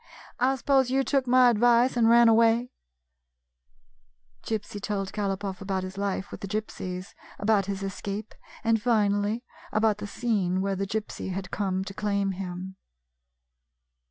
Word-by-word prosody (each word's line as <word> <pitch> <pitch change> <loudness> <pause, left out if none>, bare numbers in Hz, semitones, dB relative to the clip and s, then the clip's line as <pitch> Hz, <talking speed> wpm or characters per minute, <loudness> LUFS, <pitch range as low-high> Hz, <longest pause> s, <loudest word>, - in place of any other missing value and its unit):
I 260 +2 +3
suppose 265 0 +2
you 270 +1 +2
took 270 -2 0
my 250 0 +6
advice 240 +3 +4
and 230 -2 +4
ran 235 0 +7
away? 230 +2 +4 0.8
" - - -41
Gypsy 210 -2 -4
told 195 -2 -2
Galopoff 195 -2 -3
about 190 -1 -2
his 185 +1 -6
life 195 -1 -3
with - - -8
the 200 - -4
Gypsies; 185 -3 -5 0.2
about 205 -2 +2
his 200 -1 -3
escape, 200 +2 -5 0.3
and 225 -1 +2
finally 210 0 +1 0.3
about 215 -1 +2
the 205 - -5
scene 205 -5 0
where 195 0 0
the 195 +1 -2
Gypsy 210 -2 -4
had 190 0 -5
come 190 -2 -1
to 195 - -7
claim 200 -1 0
him. 185 0 -6
205 Hz, 150 wpm, -27 LUFS, 190-230 Hz, 0.8 s, ran